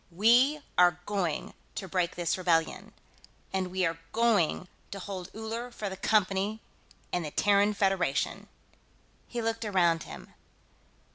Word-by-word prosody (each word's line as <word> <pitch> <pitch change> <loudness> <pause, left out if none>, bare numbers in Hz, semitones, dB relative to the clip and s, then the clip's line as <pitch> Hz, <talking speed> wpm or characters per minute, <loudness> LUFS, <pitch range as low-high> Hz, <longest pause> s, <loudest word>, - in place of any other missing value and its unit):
We 245 - +4 0.2
are 175 -1 +5
going 185 -7 -2 0.2
to 190 - -4
break 180 -1 0
this 175 -2 0
rebellion, 170 -3 0 0.6
and 190 -1 0
we 185 0 0
are 165 0 -2
going 215 -6 +2 0.2
to 200 - -6
hold 190 -2 -6
Uller 225 +2 -4
for 215 -4 -5
the 190 - -6
Company 200 +1 +1 0.5
and 175 - 0
the 150 - -4
Terran 205 +5 +3
Federation." 190 -8 0 0.8
He 240 -2 -4
looked 225 0 -1
around 175 -6 +2
him. - - -10
195 Hz, 135 wpm, -29 LUFS, 180-220 Hz, 0.8 s, are